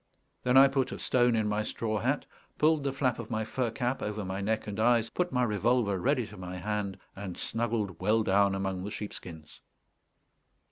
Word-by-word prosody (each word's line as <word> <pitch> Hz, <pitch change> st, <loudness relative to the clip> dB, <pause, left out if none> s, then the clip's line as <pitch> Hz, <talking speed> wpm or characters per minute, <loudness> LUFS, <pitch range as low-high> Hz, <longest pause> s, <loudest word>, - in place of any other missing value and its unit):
Then 125 Hz, +1 st, +3 dB
I 135 Hz, +1 st, +9 dB
put 135 Hz, -2 st, 0 dB
a -, -, -5 dB
stone 120 Hz, -2 st, +3 dB
in 110 Hz, -1 st, +1 dB
my 105 Hz, 0 st, 0 dB
straw 110 Hz, 0 st, -2 dB
hat, -, -, 0 dB, 0.3 s
pulled 155 Hz, -1 st, +3 dB
the 140 Hz, -, 0 dB
flap 130 Hz, -3 st, 0 dB
of 115 Hz, -1 st, -6 dB
my 110 Hz, -1 st, -1 dB
fur 125 Hz, +1 st, -1 dB
cap 125 Hz, +3 st, -2 dB
over 105 Hz, -1 st, -3 dB
my 95 Hz, +1 st, -3 dB
neck 110 Hz, +2 st, -1 dB
and 105 Hz, 0 st, -5 dB
eyes, 115 Hz, 0 st, +3 dB
put 180 Hz, -1 st, -1 dB
my 125 Hz, 0 st, +2 dB
revolver 110 Hz, -2 st, +1 dB
ready 125 Hz, +2 st, +1 dB
to 105 Hz, -, -12 dB
my 90 Hz, 0 st, -6 dB
hand, 100 Hz, 0 st, -2 dB, 0.2 s
and 95 Hz, -3 st, -6 dB
snuggled 110 Hz, -6 st, -2 dB
well 110 Hz, +3 st, +3 dB
down 100 Hz, 0 st, +3 dB
among 95 Hz, -1 st, -2 dB
the 100 Hz, -, -4 dB
sheepskins. 85 Hz, -7 st, -8 dB
110 Hz, 195 wpm, -30 LUFS, 100-125 Hz, 0.3 s, I